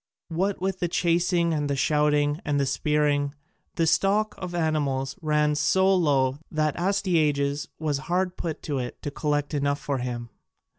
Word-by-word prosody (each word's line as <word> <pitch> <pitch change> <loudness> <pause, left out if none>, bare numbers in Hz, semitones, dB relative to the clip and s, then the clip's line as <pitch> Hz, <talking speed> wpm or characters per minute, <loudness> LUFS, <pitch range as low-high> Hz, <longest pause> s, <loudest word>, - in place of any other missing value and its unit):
What 185 +4 -1
with 190 0 -2
the 175 - 0
chasing 170 0 +1
and 145 -2 -1
the 140 - +1
shooting 150 +1 +2
and 145 -1 0
the 140 - +2
spearing, 145 0 +1 0.4
the 165 - +2
stock 200 +6 +2
of 180 -1 -5
animals 145 -5 0
ran 150 -1 +2
so 190 +5 +3
low 140 -6 +2
that 155 -1 0
Astyages 155 -7 +1
was 150 -3 -1
hard 180 +1 0
put 165 -4 -5
to 145 -3 -2
it 125 -1 -5
to 145 - -3
collect 145 0 -1
enough 140 0 0
for 140 -2 -2
him. 120 -1 -4
150 Hz, 160 wpm, -26 LUFS, 145-175 Hz, 0.4 s, so